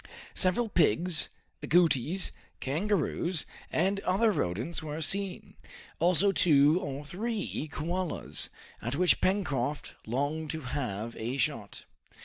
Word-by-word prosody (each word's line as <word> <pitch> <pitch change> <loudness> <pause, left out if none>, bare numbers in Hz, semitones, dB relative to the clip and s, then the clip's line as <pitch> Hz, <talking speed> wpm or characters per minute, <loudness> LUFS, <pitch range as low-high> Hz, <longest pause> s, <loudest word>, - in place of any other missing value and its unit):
Several 190 +6 +3
pigs, 170 - +3 0.3
agoutis, 170 +1 +3 0.3
kangaroos, 170 +1 0 0.3
and 190 +4 +1
other 200 +4 +2
rodents 115 - -2
were 155 0 -5
seen, 195 +3 -1 0.5
also 180 +4 +4
two 150 -2 +5
or 145 -1 -5
three 200 -2 -3
koalas, 165 - -3 0.3
at 120 +4 -2
which 180 +3 +4
Pencroft 150 -8 0
longed 145 +6 -1
to 160 +1 -3
have 120 -5 -4
a 120 +4 -3
shot. 115 -8 -2
160 Hz, 110 wpm, -30 LUFS, 140-185 Hz, 0.5 s, two